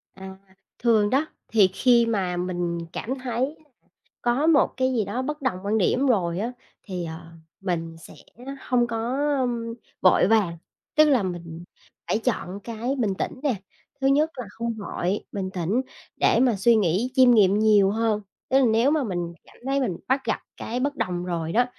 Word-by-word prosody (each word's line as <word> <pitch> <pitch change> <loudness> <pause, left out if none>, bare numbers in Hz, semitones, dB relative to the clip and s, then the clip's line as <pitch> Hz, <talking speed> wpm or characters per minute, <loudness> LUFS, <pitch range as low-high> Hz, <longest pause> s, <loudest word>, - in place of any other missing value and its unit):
À, 190 0 -9 0.4
thường 220 -3 +3
đó, 275 +6 +2 0.2
thì 215 -4 +5
khi 240 0 +4
mà 190 -6 -1
mình 175 -1 -2 0.2
cảm 250 - -3
thấy 255 +4 -1 0.7
có 245 +6 +1
một 310 -4 +4
cái 260 0 +1
gì 225 -4 +1
đó 215 +6 -3
bất 300 +3 -4
đồng 255 -9 -1
quan 210 +2 +1
điểm 250 +7 +2
rồi 180 -8 +1
á, 230 +4 -2 0.3
thì, 180 -4 -5
ờ, 165 +1 -8 0.4
mình 165 -3 -3
sẽ - - -13 0.5
hông 245 -2 +1
có 230 +3 -2 0.8
vội 185 -1 +5
vàng. 200 -6 +2 0.4
Tức 310 - +7
là 255 -7 +3
mình 170 -2 -6 0.4
phải - - +1
chọn 205 -5 -2
cái 230 +5 -3
bình 225 -7 0
tĩnh - - -4
nè, 275 -6 +1 0.5
thứ 270 - +3
nhất 295 +3 +3
là 250 - -5
không 230 +2 -3
vội, 200 -2 -3
bình 190 -2 -3
tĩnh, 185 +7 0 0.4
để - - +3
mà 250 -4 +3
suy 230 +4 +4
nghĩ, 210 +4 +1
chiêm 255 -2 +6
nghiệm 205 -3 +5
nhiều 210 -3 +5
hơn. 220 -1 0 0.3
Tức 265 - +4
là 265 - +4
nếu 230 +4 +3
mà 310 -2 +2
mình 175 -6 -3
cảm - - -20
thấy 275 +1 +1
mình 210 -11 -1
bắt 265 +1 +2
gặp - - 0 0.2
cái 240 +2 -4
bất 285 +3 -1
đồng 180 -7 -2
rồi 165 -2 -3
đó, 245 +7 +3
220 Hz, 185 wpm, -24 LUFS, 185-255 Hz, 0.8 s, Tức